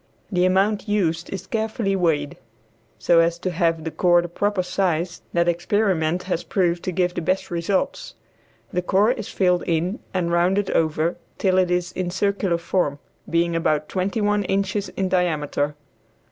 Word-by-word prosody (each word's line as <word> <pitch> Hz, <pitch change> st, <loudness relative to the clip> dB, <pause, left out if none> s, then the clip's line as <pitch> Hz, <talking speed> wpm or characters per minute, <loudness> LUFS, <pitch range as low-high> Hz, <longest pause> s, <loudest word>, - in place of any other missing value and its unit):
The 180 Hz, -1 st, +2 dB
amount 195 Hz, +4 st, +2 dB
used 175 Hz, -5 st, 0 dB
is 195 Hz, -1 st, -5 dB
carefully 220 Hz, -2 st, -1 dB
weighed, 160 Hz, -6 st, 0 dB, 0.6 s
so 170 Hz, -1 st, +4 dB
as 165 Hz, 0 st, +2 dB
to 185 Hz, +1 st, -3 dB
have 165 Hz, -2 st, 0 dB
the 160 Hz, -, -4 dB
core 175 Hz, +2 st, +3 dB
the -, -, -4 dB
proper 205 Hz, +2 st, 0 dB
size 180 Hz, -1 st, -1 dB
that 170 Hz, 0 st, +1 dB
experiment 175 Hz, -1 st, +1 dB
has 180 Hz, -2 st, -2 dB
proved 175 Hz, -3 st, 0 dB
to 185 Hz, -, -1 dB
give 180 Hz, 0 st, 0 dB
the -, -, -3 dB
best 185 Hz, +3 st, -1 dB
results. 175 Hz, +3 st, -1 dB, 0.6 s
The 180 Hz, -, +1 dB
core 200 Hz, +5 st, +3 dB
is 255 Hz, -, -4 dB
filled 180 Hz, -2 st, +2 dB
in 175 Hz, +5 st, 0 dB
and 175 Hz, -2 st, -1 dB
rounded 185 Hz, +4 st, +2 dB
over 160 Hz, +1 st, +1 dB, 0.2 s
till 185 Hz, -1 st, +2 dB
it 185 Hz, -1 st, +2 dB
is 180 Hz, 0 st, 0 dB
in 185 Hz, -1 st, -3 dB
circular 195 Hz, -1 st, 0 dB
form, 170 Hz, -4 st, -1 dB, 0.3 s
being 170 Hz, 0 st, +1 dB
about 155 Hz, -2 st, 0 dB
twenty 195 Hz, +4 st, -1 dB
one 205 Hz, 0 st, +2 dB
inches 195 Hz, +1 st, -1 dB
in 190 Hz, -, -2 dB
diameter. 155 Hz, -5 st, 0 dB
180 Hz, 165 wpm, -23 LUFS, 170-195 Hz, 0.6 s, so